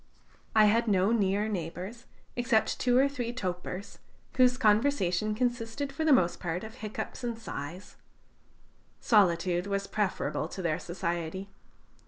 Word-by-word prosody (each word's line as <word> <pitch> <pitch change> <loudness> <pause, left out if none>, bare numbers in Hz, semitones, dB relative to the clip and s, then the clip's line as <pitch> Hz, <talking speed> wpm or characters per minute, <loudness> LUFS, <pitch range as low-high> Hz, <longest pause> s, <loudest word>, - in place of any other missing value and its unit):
I 215 -1 +7
had 230 +3 +3
no 195 0 +3
near 205 -2 +2
neighbors, 185 +4 -5 0.3
except 240 -2 +1
two 245 -1 +3
or 270 +2 +5
three 250 -4 -3
topers, 185 -3 -5 0.4
whose 250 -1 +5
conversation 215 -4 +2
consisted 245 +3 -2
for 320 - -2
the 315 - +3
most 180 -10 +4
part 175 0 -3
of 220 0 -8
hiccups 215 +3 -6
and 235 -2 -2
sighs. 180 -4 -7 1.0
Solitude 180 -3 +3
was 200 0 -1
preferable 205 -1 -1
to 190 - -7
their 160 -3 0
society. 175 +2 -4
210 Hz, 135 wpm, -29 LUFS, 180-240 Hz, 1.0 s, I